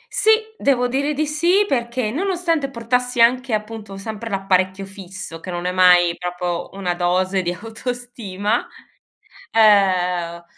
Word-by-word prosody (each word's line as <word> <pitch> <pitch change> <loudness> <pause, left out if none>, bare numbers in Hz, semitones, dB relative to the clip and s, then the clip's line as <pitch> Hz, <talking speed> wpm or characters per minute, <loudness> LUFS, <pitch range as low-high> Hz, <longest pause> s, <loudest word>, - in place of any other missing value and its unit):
Sì, 435 - +2 0.3
devo 250 -3 +2
dire 280 +4 -1
di 305 +2 0
sì, 345 +7 +2
perché 235 - -1
nonostante 335 - -1
portassi 250 0 -1
anche, 250 0 +3
appunto, 215 -2 -4
sempre 220 +3 -6
l'apparecchio 190 -1 0
fisso 190 -3 -9
che 185 - -9
non 175 0 -4
è 180 - 0
mai 180 -2 +5
proprio 180 0 -3
una 180 -3 -1
dose 185 +2 0
di 175 -1 -2
autostima, 225 0 -4 0.8
ehm, 180 -5 +3
210 Hz, 130 wpm, -20 LUFS, 180-250 Hz, 0.8 s, mai